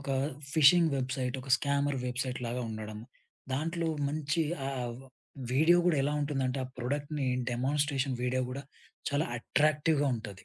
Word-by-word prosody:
ఒక 140 - -5 0.4
fishing 160 +2 +6
website 130 -1 -2
ఒక 135 - -9
scammer 140 -1 0
website 125 0 -2
లాగా 120 +1 -2
ఉండడం. 110 -1 -6 0.5
దాంట్లో 165 +4 -1 0.2
మంచి 150 +2 0 0.2
ఆ - - -1 0.3
వ - - -13 0.5
వీడియో 160 +6 +5
గూడా 175 -3 +3
ఎలా 145 +2 +1
ఉంటుందంటే 135 -3 -1
ఆ - - -5
ప్రొడక్ట్‌ని 145 +3 -2 0.2
డెమాన్‌స్ట్రెషన్ 135 +1 0
వీడియో 125 +1 +1
గూడా 135 +2 -5 0.5
చాలా 145 +2 +1
అట్రాక్టివ్‌గా 150 +3 +2
ఉంటది. 105 -4 -9
140 Hz, 140 wpm, -31 LUFS, 125-150 Hz, 0.5 s, fishing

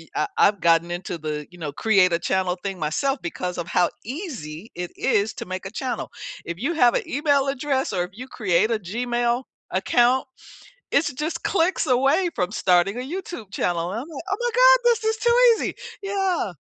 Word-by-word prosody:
uh, - - +1
I've 205 -2 +4
gotten 165 0 +3
into 175 0 -4
the, 150 -1 -4
you 175 - -14
know, 150 -3 -4
create 185 +2 +3
a - - +3
channel 185 +1 0
thing 195 -2 -4
myself 265 - 0
because 180 +1 -4
of 170 - -4
how 175 0 +2 0.2
easy 230 - -7
it 175 0 -4
is 220 -4 +1
to - - -6
make 185 +1 -5
a - - -9
channel. 255 +2 -3 0.4
If 170 - -5
you 280 +10 -1
have 245 -7 +4
a - - -1
email 285 -1 +2
address 275 -3 -1
or 180 -2 +1
if 180 - -14
you 250 +5 -9
create 210 -3 +1
a 225 - +1
Gmail 240 +5 -1 0.3
account, 240 +7 +3 0.7
it's 290 +1 +2
just 300 +6 -4
clicks 365 -1 +1
away 270 +8 +3
from 180 0 -1
starting 185 -1 +2
a - - -2
YouTube 285 - -6
channel. 175 -2 -1
And 220 - -3
I'm 280 - -9
like, 320 -3 -8
"Oh 390 - +1
my 485 0 0
God, - - +7
this 470 -2 +3
is 440 0 +1
too 475 +2 +3 0.2
easy." - - -3 0.3
Yeah. 385 - -1
230 Hz, 200 wpm, -23 LUFS, 180-285 Hz, 0.7 s, God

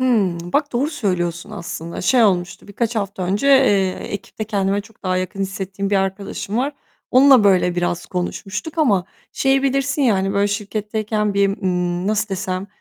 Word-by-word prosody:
Hımm, 190 -9 +1
bak 290 -1 +1
doğru 270 +6 0
söylüyorsun 180 - -2
aslında. 170 -4 -6
Şey 240 +4 +4
olmuştu, 185 -1 0
birkaç 230 +3 -2
hafta 200 -2 -3
önce, 195 +8 0
eee, 205 -9 +5 0.2
ekipte 205 +1 -5
kendime 200 -1 0
çok 220 +1 -18
daha 185 -1 0
yakın 185 +1 -3
hissettiğim 195 0 -3
bir 200 - +3
arkadaşım 195 +2 -2
var. 270 +4 0 0.4
Onunla 260 -3 +7
böyle 185 -3 +4
biraz 175 -1 -1
konuşmuştuk 195 - -4
ama 205 - +3 0.3
şeyi 270 0 +2
bilirsin 275 +1 +1
ya, 240 -6 +4
hani, 195 0 0
böyle, 200 0 +2
şirketteyken 210 0 -2
bir, 200 0 +3
ımm 180 -2 -1
nasıl 215 +1 0
desem? 185 0 -3
200 Hz, 165 wpm, -20 LUFS, 185-225 Hz, 0.4 s, Onunla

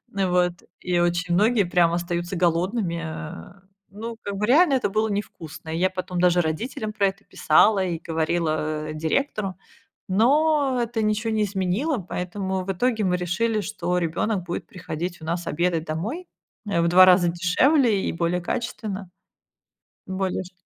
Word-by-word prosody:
и 195 - +1
вот, 180 -1 +2 0.3
и 175 -1 0
очень 175 0 0
многие 210 +3 +3
прям 175 -1 +2
остаются 175 +1 -2
голодными. 175 +1 0
Э, 165 +4 -8 0.3
ну, 225 +3 -7
как 200 -1 -5
бы 210 - 0
реально 290 +5 +5
это 255 -6 +1
было 215 +2 +1
невкусно. 165 -6 -6
И 160 - -2
я 185 +1 +3
потом 185 -1 -4
даже 180 -1 +4
родителям 215 +7 -3
про 200 -2 +2
это 195 +2 -5
писала 205 -3 +3
и 170 -3 -2
говорила 155 -1 -1
директору, 195 - -1 0.5
но 275 +5 +3
это 230 -1 -2
ничего 215 +1 0
не 215 -1 +2
изменило, 200 - -1
поэтому 190 0 -3
в 195 - -1
итоге 220 +3 0
мы 180 -1 +1
решили, 215 +5 0
что 180 -4 -2
ребёнок 180 +4 -1
будет 175 - -5
приходить 170 -1 -6
у - - -8
нас 170 +1 -3
обедать 170 0 0
домой. 220 - -4 0.4
Э, 170 -4 +1
в 170 - +2
2 185 +2 +8
раза 180 -1 +5
дешевле 205 - +2
и - - 0
более 170 +1 -1
качественно. 200 -2 -4 1.0
Более 190 0 -2
шт 185 - -13
185 Hz, 160 wpm, -24 LUFS, 175-215 Hz, 1.0 s, 2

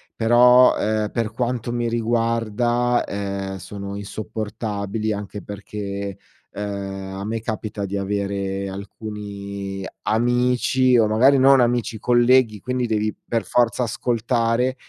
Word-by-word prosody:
Però, 125 +2 +6
ehm, 105 0 -1
per 115 -2 -1
quanto 120 0 -2
mi 120 0 -1
riguarda, 115 +1 +1
ehm, 100 -1 -4
sono 100 +2 -7
insopportabili, 105 +1 -4
anche 105 0 -6
perché, 100 -1 -6 0.3
ehm, 95 -1 -5
a 100 - -4
me 115 +2 -2
capita 110 -2 -4
di 100 - -4
avere 100 0 -2
alcuni 100 -1 -6 0.2
amici 125 +2 +2
o 110 - +4
magari 130 +6 +5
non 135 0 +6
amici, 120 -2 0
colleghi, 120 -2 +4
quindi 125 +3 -2
devi 110 -1 0
per 115 -1 -1
forza 120 0 +2
ascoltare 120 +1 0
110 Hz, 115 wpm, -22 LUFS, 100-120 Hz, 0.3 s, Però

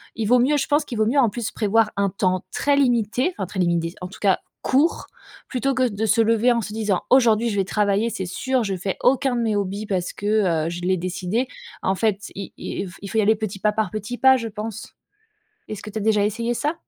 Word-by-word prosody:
il 225 - -2
vaut 250 +3 +5
mieux 270 +5 +3
je 270 - -1
pense 295 0 +2
qu'il 235 - -6
vaut 215 - +3
mieux 275 +4 +2
en 240 - +4
plus 225 +1 -4
prévoir 220 0 +2
un 200 -1 +2
temps 185 -1 -1
très 285 -1 +2
limité, 250 - +1
enfin 190 - -3
très 190 - -6
limité, 170 -1 0
en 180 - -4
tout 195 - -13
cas, 195 -2 +3 0.2
court, 285 +6 +1 0.4
plutôt 270 +1 0
que 255 -1 +2
de 210 +1 -2
se 220 +2 +3
lever 230 +2 +3
en 235 - 0
se 210 - -6
disant: 210 -4 0
«Aujourd'hui, 235 -3 +4
je 205 - -2
vais 195 - +3
travailler, 205 +3 +1
c'est 190 - -4
sûr, 255 +7 -1
je 195 -3 -2
fais 185 +1 -3
aucun 265 0 +3
de - - 0
mes 220 -2 0
hobbies 200 +2 -3
parce 180 -3 -2
que, 200 -6 +1
heu, - - -1
je 175 +1 -5
l'ai 185 0 +1
décidé» 185 +7 -2 0.3
en 190 - +1
fait, 210 -1 -1
il 195 0 -7
il - - -5
il 190 - -7
f 175 - -13
il 200 - -7
faut 225 - -3
y 220 - +5
aller 220 +2 +4
petit 210 -2 -5
pas 210 +1 +2
par 215 -4 -1
petit 215 +3 -5
pas, 265 0 +6
je 230 -2 -4
pense. 215 +1 -7 0.8
Est-ce 215 -2 -6
que 210 - -8
tu 215 - -4
as - - -4
déjà 210 -1 +3
essayé 230 +3 -2
ça? 295 +6 -1
215 Hz, 255 wpm, -22 LUFS, 195-240 Hz, 0.8 s, pas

